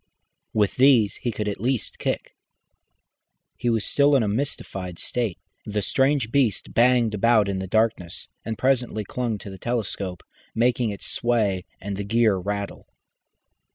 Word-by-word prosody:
With 105 -2 +1
these 125 -6 +5
he 120 - -2
could 105 -1 -3
at 100 -2 -3
least 125 0 -1
kick. - - -3 1.2
He 120 - -1
was 110 -3 +1
still 145 0 +4
in 130 - +4
a - - 0
mystified 100 -6 -3
state. 115 -7 -2 0.3
The 105 -1 -2
strange 135 -2 +2
beast 130 -6 +1
banged 120 -2 +4
about 110 0 +4
in 95 -1 -1
the 95 - -4
darkness, 110 -4 0 0.2
and 110 0 -4
presently 125 -5 +1
clung 120 0 -2
to 100 - -9
the 95 - -10
telescope, 100 -6 -3 0.3
making 120 0 +2
it 100 -2 -6
sway 105 -6 0
and 100 0 -5
the 100 - -3
gear 110 0 +3
rattle. 100 +2 -4
110 Hz, 155 wpm, -24 LUFS, 100-120 Hz, 1.2 s, these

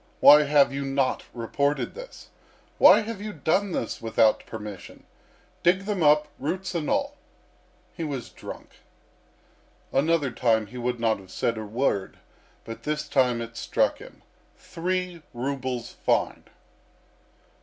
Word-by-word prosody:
Why 150 +1 +8
have 140 -1 +4
you 140 0 -3
not 135 -1 0
reported 140 +5 -1
this? - - -11 0.5
Why - - +8
have 215 -2 -6
you 210 0 -5
done 185 +4 0
this 115 - -3
without 110 -1 +2
permission? 105 -4 -9 0.6
Dig 180 +2 +3
them 200 -2 -3
up, 150 0 +4
roots 185 +7 -3
and 165 -4 -2
all.' 280 +1 -1 0.8
He 170 - -4
was 140 -6 -4
drunk. - - -10 1.1
Another 145 0 +2
time 115 -3 +1
he 115 +5 -11
would 120 0 -2
not 115 -3 +1
have 95 -1 -15
said 115 +5 -1
a 110 - -5
word, 105 -3 -1 0.5
but 115 - -8
this 150 0 -3
time 125 -4 +2
it 115 0 -10
struck - - 0
him. - - -14 0.3
Three 180 0 -3
rubles 130 -1 -3
fine!..." - - 0
140 Hz, 135 wpm, -26 LUFS, 115-170 Hz, 1.1 s, Why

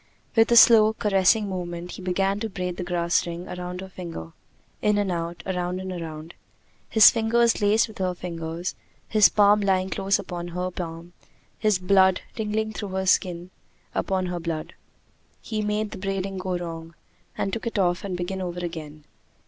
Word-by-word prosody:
With 225 0 +4
a - - +6
slow, 220 -2 +8
caressing 205 0 +2
movement 175 -2 -5
he - - -8
began 195 +2 0
to 225 0 -3
braid 180 -2 -4
the 180 - -3
grass 175 -1 0
ring 170 +1 -6
around 180 0 -6
her 190 - -7
finger 170 - -8 0.5
in 210 -1 +2
and 200 -2 0
out, 170 0 -4
around 180 -1 -2
and 190 0 -5
around, 165 -2 -7 0.6
his 220 -2 +8
fingers 230 0 +2
laced 210 +2 +3
with 220 - -13
her 185 -1 -1
fingers, 170 0 -5 0.3
his 215 -2 +6
palm 205 0 +4
lying 190 -1 +1
close 195 +1 +1
upon 175 -1 -6
her 180 +1 -3
palm, 170 -1 -7 0.5
his 215 -3 +3
blood 190 0 +4
tingling 220 0 -2
through 205 -3 -6
the 190 0 -1
skin 180 -1 +1 0.4
upon 190 -1 -1
her 180 -1 -3
blood. 165 -2 -4 0.7
He 215 -1 -3
made 210 0 -1
the 200 - -7
braiding 195 0 -3
go 185 -1 -2
wrong, 165 -1 -7 0.4
and 195 - -2
took 230 +1 -3
it 230 - -3
off 175 -2 +1
and 190 -3 -3
began 190 +2 -3
over 175 -1 -4
again. 155 -3 -7
185 Hz, 175 wpm, -25 LUFS, 175-205 Hz, 0.7 s, slow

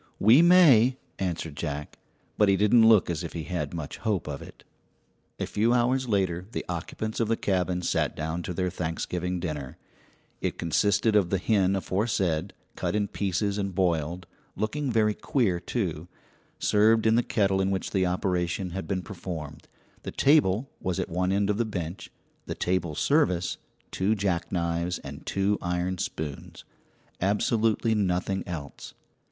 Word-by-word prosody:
"We 115 +9 +6
may," 145 -9 +6 0.2
answered 85 -5 -3
Jack; 75 0 -5 0.4
but 105 -2 +4
he 100 - +4
didn't 110 +3 +5
look 110 -4 +5
as 85 -1 -2
if 85 - -6
he 80 - -4
had 85 +4 -3
much 80 -4 -6
hope 105 -8 -1
of 70 -2 -5
it. - - -13 0.8
A - - -1
few 115 +3 +1
hours 125 +1 +1
later 95 -3 0
the - - -3
occupants 90 +5 -4
of 115 - +1
the 115 +1 +1
cabin 90 -2 0
sat - - 0
down 80 +2 -3
to 90 - -5
their 90 0 -1
Thanksgiving 90 +2 -3
dinner. 75 -6 -5 0.6
It - - -2
consisted 100 +6 +2
of 100 -5 +3
the 95 - +1
hen 95 0 +2
aforesaid, 95 -3 -1 0.2
cut - - -2
in 105 -1 0
pieces 100 +1 -1
and 100 -2 -3
boiled 85 -1 0 0.3
looking 130 +7 -2
very 110 -2 +3
queer, 105 - 0
too 90 -6 -3 0.5
served 110 +2 +3
in 110 - +5
the 120 - +4
kettle 100 -5 +1
in 95 - +1
which 95 -1 -2
the 95 -2 +2
operation 90 0 -1
had 95 -2 -5
been 95 0 -2
performed. 80 -5 -7 0.3
The - - -6
table 135 -5 +3
was 90 -2 -2
at - - -2
one 90 +2 0
end 100 +1 +1
of 105 - -2
the - - +3
bench, 90 -5 -5 0.4
the - - -3
table 90 -4 -1
service 115 - +1 0.3
two 100 +4 +1
jackknives 85 -2 -1
and - - -9
two 100 +1 +1
iron 90 +1 -2
spoons 75 -3 -5 0.6
absolutely 110 +3 +1
nothing 95 -2 0
else. 80 -5 -7
95 Hz, 160 wpm, -27 LUFS, 85-105 Hz, 0.8 s, We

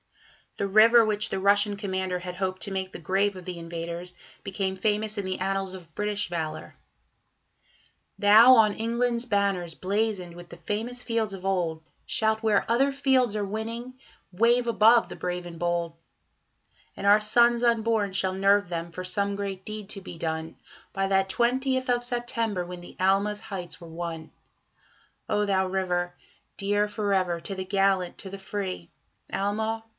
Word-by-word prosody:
The 200 - -1
river 225 +3 +6
which 215 0 0
the - - -2
Russian 205 +1 +3
commander 190 -2 -2
had 180 0 -7
hoped 185 0 -2
to 200 - -2
make 190 -1 -3
the - - -8
grave 195 +4 +1
of 185 -1 -10
the 180 -1 -5
invaders 170 +1 -6 0.3
became 190 -1 -2
famous 210 +2 -1
in 200 - -1
the 185 0 -2
annals 195 0 -2
of 170 -4 -11
British 210 0 -1
valour: 165 -3 -5 1.4
Thou, 220 +5 +8
on 215 -3 +5
England's 235 +2 0
banners 200 -6 0
blazoned 195 -3 -2
with 175 0 -11
the 170 - -10
famous 225 +8 -3
fields 225 -3 -1
of 190 -1 -8
old, 170 -4 -1 0.2
Shalt, 220 0 0
where 215 -3 +3
other 265 +5 +3
fields 265 -5 +2
are 205 -1 -1
winning, 230 +4 -5 0.4
wave 240 +5 +3
above 230 +1 +5
the - - -8
brave 180 0 -4
and 170 -1 -9
bold; 170 -1 -1 1.0
And 200 - -2
our 205 +1 +6
sons 235 +2 +3
unborn 225 -3 +2
shall 190 0 0
nerve 200 +1 +3
them 170 -1 -4
for 185 +2 -6
some 200 +2 -1
great 195 -2 -4
deed 215 -1 -7
to 200 -2 -3
be 175 - -9
done, 160 0 -4 0.4
By 195 0 0
that 195 0 +2
twentieth 260 +4 0
of 245 0 +2
September, 230 -6 -2
when 180 0 -8
the 175 - -13
Alma's 200 +2 +2
heights 180 -5 -7
were 170 - -11
won. 165 -1 -6 1.0
O 210 0 +1
thou 190 -2 +1
river! 180 -2 -1 0.4
dear 205 +1 +1
for 210 -1 -1
ever 180 -3 +1
to 195 +4 -5
the 190 0 -4
gallant, 195 -2 +1
to 195 - -7
the 195 +1 -8
free, 190 - -5 0.4
Alma! 220 +3 -2
200 Hz, 170 wpm, -26 LUFS, 185-220 Hz, 1.4 s, Thou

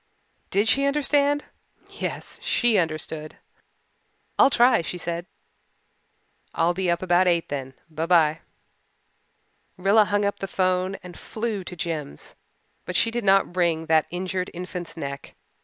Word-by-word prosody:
Did 205 +3 +2
she 275 +4 +4
understand! 290 0 +2 0.4
Yes, - - -5
she 235 -5 +2
understood. 155 -2 -3 1.0
"I'll - - +7
try," 245 -3 +4
she 175 +2 -5
said. 170 +1 -4 1.3
"I'll 170 +1 +2
be 185 0 -1
up 170 +1 0
about 180 0 +3
eight 170 -2 +1
then. 135 -2 -5
By 160 0 -4
by." 160 -3 +4 1.4
Rilla 200 +4 +4
hung 205 0 +1
up 200 - -1
the 195 - -4
'phone 185 +1 0
and 180 -1 -10
flew 215 -3 -4
to 180 - -7
Jims. 155 - -5 0.5
But 180 - -6
she 230 - +3
did 240 0 -2
not 195 -2 +3
wring 170 -3 +1
that 160 -1 +3
injured 185 +1 -3
infant's 180 -1 -6
neck. 140 -3 -6
180 Hz, 140 wpm, -24 LUFS, 165-205 Hz, 1.4 s, I'll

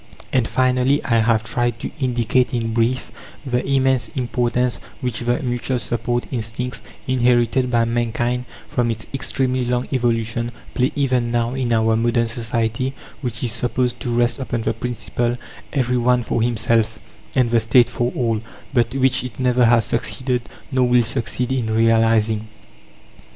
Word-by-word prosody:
And 125 -4 +2
finally, 130 +2 +2
I 115 - +3
have 110 0 +2
tried 120 0 -1
to - - -4
indicate 125 -1 +1
in 115 -1 -1
brief 120 +3 0 0.3
the 125 -1 0
immense 130 -3 +2
importance 125 -1 0 0.2
which 125 -5 -2
the 120 0 0
mutual 125 +1 -1
support 120 0 -1
instincts, 115 0 -3 0.2
inherited 125 0 +2
by 120 -1 +3
mankind 120 +1 -1 0.2
from 120 -2 0
its 110 -1 -3
extremely 130 -1 0
long 125 0 -1
evolution, 115 -1 0 0.2
play 130 +3 +1
even 130 -4 +1
now 120 0 0
in 130 -3 -1
our 110 0 +3
modern 115 +1 +2
society, 115 +3 -1 0.3
which 125 -2 -4
is 120 - +1
supposed 125 +2 -1
to - - -3
rest 120 +1 +1
upon 120 -3 -2
the - - 0
principle: 120 0 -2 0.3
"every 125 -3 +1
one 125 0 +2
for 115 - -1
himself, 115 -1 +1 0.4
and 125 -3 +3
the 120 - +4
State 115 +2 +4
for 120 +1 -1
all," 115 -3 0 0.3
but 120 0 +1
which 130 -1 +2
it 125 -4 -7
never 125 -1 +3
has 115 -1 +4
succeeded, 125 +1 -1 0.3
nor 130 -1 +3
will 125 0 +4
succeed 125 +1 -1
in 125 -4 0
realizing. 110 -1 +3
120 Hz, 155 wpm, -21 LUFS, 115-125 Hz, 0.4 s, the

